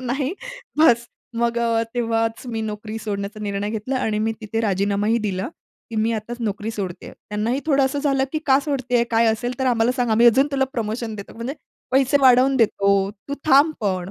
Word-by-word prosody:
नाही 265 +5 -1 0.5
बस. 235 -6 +5 0.3
मग 235 0 +1
अ, 230 -1 +1
तेव्हाच 225 0 -1
मी 225 -2 -3
नोकरी 215 0 -5
सोडण्याचा 205 0 -5
निर्णय 200 0 -2
घेतला 225 +5 -3
आणि 220 -4 -1
मी 220 +1 0
तिथे 225 +1 -3
राजीनामाही 205 +2 +1
दिला, 195 -4 -2 0.4
की 225 - -5
मी 220 +2 +1
आताच 225 +2 -4
नोकरी 215 0 -2
सोडतेय. 190 -5 -6
त्यांनाही 220 +6 -3
थोडं 275 -3 +3
असं 265 +2 -1
झालं, 275 -2 +1
की 310 - 0
"का 265 -1 +5
सोडतेय? 255 -5 0
काय 230 0 +3
असेल 240 +3 -1
तर 265 - 0
आम्हाला 240 0 +2
सांग, 245 -3 0
आम्ही 230 +2 +5
अजून 260 +4 +5
तुला 270 -1 +2
प्रमोशन 225 -1 -3
देतो. 200 -2 -9
म्हणजे 235 +4 -5 0.4
पैसे 270 +1 +3
वाढवून 260 +1 +5
देतो, 200 -4 +2 0.4
तू 280 - -2
थांब 295 +2 +5
पण." 190 -3 -2
230 Hz, 185 wpm, -22 LUFS, 215-255 Hz, 0.5 s, बस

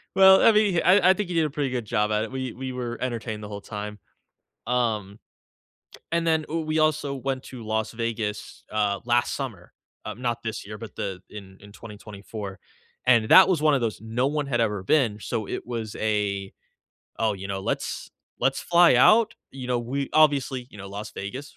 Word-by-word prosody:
Well, 190 0 +8
I 225 - +6
mean, 205 -5 +3
I 185 0 +6
I - - +8
think 205 -1 -3
he 175 - -4
did 165 - +3
a 150 - 0
pretty 140 -3 -2
good 125 -2 -2
job 105 -1 0
at 105 0 +1
it; 115 - -6
we 130 -2 -4
we 130 +1 -5
were 120 -2 -4
entertained 115 -4 -4
the 105 - -7
whole 100 0 -6
time. 105 0 -7 0.7
Um, 110 -5 -1 0.9
and 170 0 0
then, 160 -1 +2
ooh, 165 +1 -1
we 155 0 0
also 150 -2 +1
went 135 0 -3
to 120 -4 -9
Las 110 0 -2
Vegas, 115 -2 -4
uh, 105 -2 0
last 120 0 +2
summer, 115 -11 -6 0.3
um, 120 - -7
not 120 -2 -2
this 110 -3 -5
year, 105 +1 -7
but 115 -1 -10
the 95 -2 -4
in 95 -2 -11
in 100 0 -13
2024, 105 -2 -9 0.5
and 120 -3 +5
that 190 0 +9
was 165 -5 +1
one 155 -1 +4
of 135 - +2
those 110 -2 -3
no 115 +4 -1
one 150 0 -1
had 120 -4 -1
ever 105 -4 0
been, 110 -2 +2
so 110 0 -4
it - - -5
was 115 -3 -5
a 105 -2 -1 0.7
oh, 110 -1 +2
you 95 0 -7
know, 95 0 -3
"let's - - -3 0.3
let's 135 +2 +1
fly 175 -5 +5
out," 215 - +5 0.2
you 130 -2 -7
know, 125 -1 0
we 135 +4 -3
obviously, 140 -5 +3
you - - -13
know, 100 0 -8
Las 100 +2 -7
Vegas, 130 +9 -7
120 Hz, 205 wpm, -25 LUFS, 105-140 Hz, 0.9 s, that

